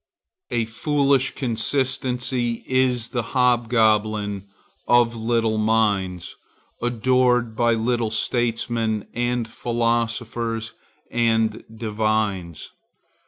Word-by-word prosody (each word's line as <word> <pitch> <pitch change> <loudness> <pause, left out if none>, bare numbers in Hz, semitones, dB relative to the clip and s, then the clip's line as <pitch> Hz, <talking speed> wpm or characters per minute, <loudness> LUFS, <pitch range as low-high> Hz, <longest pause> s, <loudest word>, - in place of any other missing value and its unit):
A 115 -1 0
foolish 140 +3 +1
consistency 125 -1 -1
is 130 -3 +1
the 120 - -1 0.2
hobgoblin 110 -5 +2 0.4
of 120 -1 +4
little 115 -1 0
minds, 105 -5 0 0.5
adored 125 0 +2
by 120 0 +2
little 115 0 0
statesmen 115 -1 -1
and 120 -1 -1
philosophers 115 -1 -2 0.4
and 115 -2 +1
divines. 110 -6 -2
115 Hz, 75 wpm, -23 LUFS, 110-120 Hz, 0.5 s, of